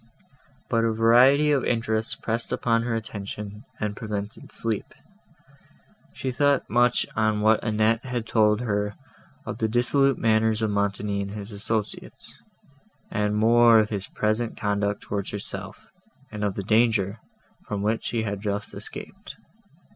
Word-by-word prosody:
But 115 -1 +1
a 115 - +2
variety 125 +7 +5
of 140 -3 +2
interests 110 -2 0
pressed 115 +1 -3
upon 115 -1 +1
her 115 0 -1
attention, 105 0 -6
and 105 -1 -2
prevented 105 -1 -6
sleep. 115 -3 -3 1.2
She 130 - -4
thought 140 +1 +2
much 120 0 +3
on 110 -1 +1
what 110 +1 +3
Annette 110 +1 +1
had 125 -3 -3
told 105 -1 +3
her 105 -3 -1 0.5
of - - -5
the 110 - +1
dissolute 135 +4 +2
manners 110 0 +2
of 110 - +1
Montoni 100 0 -1
and 100 - -4
his 105 +1 -7
associates, 105 +1 -5 0.7
and 105 0 0
more 115 +1 +6
of 110 -1 +3
his 100 -3 -3
present 110 +2 -1
conduct 100 -1 -1
towards 100 -1 -4
herself, 95 -1 -7 0.4
and 105 -1 -5
of 100 -2 -1
the 100 - -3
danger, 110 -1 +2 0.5
from 100 -1 -3
which 110 +2 0
she 115 -2 -1
had 100 -2 -3
just 105 0 -3
escaped. 200 - -8
110 Hz, 145 wpm, -25 LUFS, 105-115 Hz, 1.2 s, more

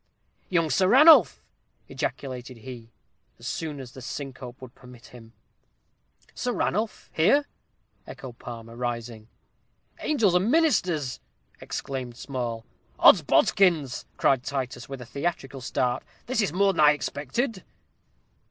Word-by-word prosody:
"Young 165 -4 +1
Sir 185 - +3
Ranulph!" 300 - +7 0.4
ejaculated 130 -2 -5
he, 115 -1 -10 0.5
as - - -13
soon 155 -3 -4
as 130 -3 -9
the 130 - -11
syncope 130 -1 -7
would 130 -2 -11
permit 125 -3 -15
him. 115 -2 -14 1.0
"Sir 245 - -2
Ranulph 215 +2 -2
here?" 280 - +4 0.6
echoed 125 -3 -10
Palmer, 115 -1 -9
rising. 115 -2 -5 0.7
"Angels 225 - +2
and 180 +5 +2
ministers!" 185 - +1 0.4
exclaimed 125 -3 -5
Small. 120 -5 -4 0.3
"Odsbodikins!" 165 -10 +4
cried 130 -2 +2
Titus, 130 -3 -4
with 135 -2 -7
a - - -8
theatrical 140 -1 -4
start; 125 0 -1 0.2
"this 240 -2 0
is 200 - 0
more 195 +3 +2
than 165 - -5
I 150 0 +7
expected." 175 - -3
135 Hz, 120 wpm, -26 LUFS, 125-180 Hz, 1.0 s, Ranulph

